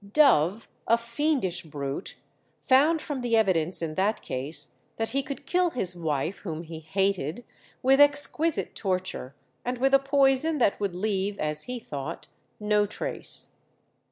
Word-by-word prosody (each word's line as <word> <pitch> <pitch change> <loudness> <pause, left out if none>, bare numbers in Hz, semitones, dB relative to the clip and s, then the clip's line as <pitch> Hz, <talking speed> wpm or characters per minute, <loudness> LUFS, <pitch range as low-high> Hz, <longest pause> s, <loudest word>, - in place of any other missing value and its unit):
Dove, 220 - +4 0.2
a 230 - +5
fiendish 235 - -1
brute, 145 -1 -5 0.5
found 300 +5 +4
from 280 -4 -4
the 235 -2 +2
evidence 180 -5 +2
in 160 -1 -3
that 200 +6 0
case 145 +3 -4 0.2
that 225 0 -1
he 275 +4 +1
could 270 +1 -7
kill 360 0 +2
his 190 - -1
wife, 160 +1 -2
whom 165 -4 -5
he 165 -1 -8
hated, 190 - -1 0.4
with 270 +2 +5
exquisite 290 +2 +3
torture, 185 - -3 0.3
and 250 +1 -2
with 270 +2 +2
a 275 - +8
poison 275 +2 +3
that 230 -7 +2
would 200 -4 -2
leave, 200 +1 -1
as 150 0 -1
he 250 - -2
thought, 140 -10 -6 0.3
no 210 -1 +2
trace. 210 - -3
205 Hz, 150 wpm, -27 LUFS, 165-270 Hz, 0.5 s, a